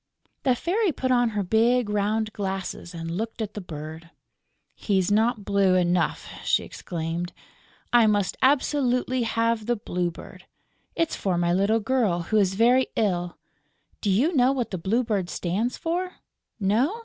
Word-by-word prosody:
The 255 Hz, -3 st, +2 dB
Fairy 380 Hz, -, 0 dB
put 260 Hz, -3 st, -2 dB
on 245 Hz, -1 st, +3 dB
her 210 Hz, -2 st, -2 dB
big, 230 Hz, +4 st, +2 dB
round 210 Hz, +1 st, 0 dB
glasses 190 Hz, -3 st, -4 dB
and 165 Hz, 0 st, -5 dB
looked 225 Hz, +7 st, -4 dB
at 215 Hz, -2 st, -3 dB
the 210 Hz, -, -5 dB
bird: 160 Hz, -1 st, -8 dB, 0.6 s
"He's 195 Hz, -2 st, 0 dB
not 220 Hz, 0 st, +2 dB
blue 195 Hz, -2 st, +3 dB
enough," 180 Hz, -1 st, +1 dB, 0.2 s
she -, -, +2 dB
exclaimed. 170 Hz, +1 st, -5 dB, 0.6 s
"I 235 Hz, -2 st, +6 dB
must 205 Hz, -3 st, +1 dB
absolutely 260 Hz, -2 st, +2 dB
have 230 Hz, -1 st, 0 dB
the 240 Hz, -, +2 dB
Blue 180 Hz, -4 st, -2 dB
Bird. 165 Hz, -, -12 dB, 0.5 s
It's 330 Hz, -1 st, 0 dB
for 185 Hz, -3 st, -1 dB
my 175 Hz, 0 st, +1 dB
little 200 Hz, +5 st, +2 dB
girl, 220 Hz, -7 st, +1 dB
who -, -, +5 dB
is 195 Hz, -2 st, +2 dB
very 245 Hz, +4 st, +4 dB
ill.... 180 Hz, -5 st, -1 dB, 0.6 s
Do 205 Hz, -, 0 dB
you 265 Hz, -, +2 dB
know 255 Hz, 0 st, +4 dB
what 255 Hz, -4 st, -2 dB
the 185 Hz, -, -3 dB
Blue 220 Hz, +9 st, +1 dB
Bird 200 Hz, -6 st, -1 dB
stands 200 Hz, +9 st, -2 dB
for? 360 Hz, +2 st, -2 dB, 0.4 s
No? 235 Hz, -, +1 dB
210 Hz, 160 wpm, -25 LUFS, 185-245 Hz, 0.6 s, I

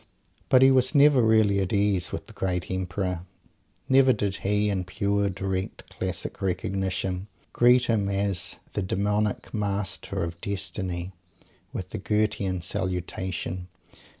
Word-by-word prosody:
But 130 Hz, 0 st, +6 dB
he 135 Hz, -, +7 dB
was 130 Hz, +2 st, +3 dB
never 140 Hz, -2 st, +6 dB
really 110 Hz, -3 st, +4 dB
at 95 Hz, -2 st, -1 dB
ease 100 Hz, -3 st, +1 dB
with -, -, -5 dB
the -, -, -14 dB
great 90 Hz, -1 st, -2 dB
Emperor. 90 Hz, -1 st, -2 dB, 0.7 s
Never 135 Hz, -1 st, +6 dB
did 100 Hz, -3 st, -1 dB
he 105 Hz, +1 st, +1 dB
in 95 Hz, -2 st, -1 dB
pure, 100 Hz, +2 st, 0 dB
direct, 95 Hz, 0 st, -4 dB
classic -, -, -3 dB
recognition 95 Hz, 0 st, -2 dB, 0.3 s
greet 125 Hz, +1 st, +5 dB
him 105 Hz, -4 st, +1 dB
as 100 Hz, -1 st, 0 dB, 0.2 s
"the 105 Hz, -, -1 dB
Demonic 105 Hz, +2 st, -1 dB
Master 100 Hz, -5 st, -2 dB
of 85 Hz, 0 st, -5 dB
Destiny," 95 Hz, -2 st, -3 dB, 0.6 s
with 90 Hz, 0 st, -6 dB
the 110 Hz, -, -4 dB
Goethean 100 Hz, -3 st, 0 dB
salutation! 90 Hz, 0 st, -3 dB
100 Hz, 130 wpm, -26 LUFS, 95-105 Hz, 0.7 s, he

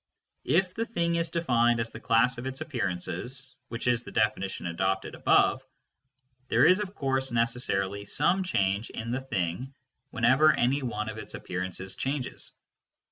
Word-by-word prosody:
If 180 Hz, +6 st, +2 dB
the 230 Hz, +1 st, -2 dB
thing 170 Hz, -6 st, 0 dB
is 165 Hz, -1 st, 0 dB
defined 120 Hz, -8 st, +2 dB
as 115 Hz, 0 st, -2 dB
the -, -, -8 dB
class 120 Hz, +1 st, +3 dB
of 125 Hz, -, -5 dB
its 130 Hz, 0 st, -4 dB
appearances 125 Hz, -, -3 dB
(which 115 Hz, -, -5 dB
is 120 Hz, -1 st, +3 dB
the -, -, -10 dB
definition 95 Hz, -4 st, 0 dB
adopted 95 Hz, +3 st, -1 dB
above), -, -, +3 dB, 0.9 s
there -, -, +4 dB
is 185 Hz, +2 st, +6 dB
of 205 Hz, -1 st, -4 dB
course 135 Hz, -1 st, -1 dB
necessarily 115 Hz, -4 st, 0 dB
some 175 Hz, -, +2 dB
change 100 Hz, -, 0 dB
in 115 Hz, +1 st, -5 dB
the 130 Hz, +2 st, -1 dB
thing 125 Hz, +2 st, -3 dB, 0.3 s
whenever 135 Hz, +7 st, +5 dB
any 135 Hz, +4 st, +1 dB
one 110 Hz, -4 st, -3 dB
of 110 Hz, 0 st, -5 dB
its -, -, -7 dB
appearances 95 Hz, +1 st, -4 dB
changes. 135 Hz, -1 st, -3 dB
125 Hz, 155 wpm, -28 LUFS, 105-140 Hz, 0.9 s, is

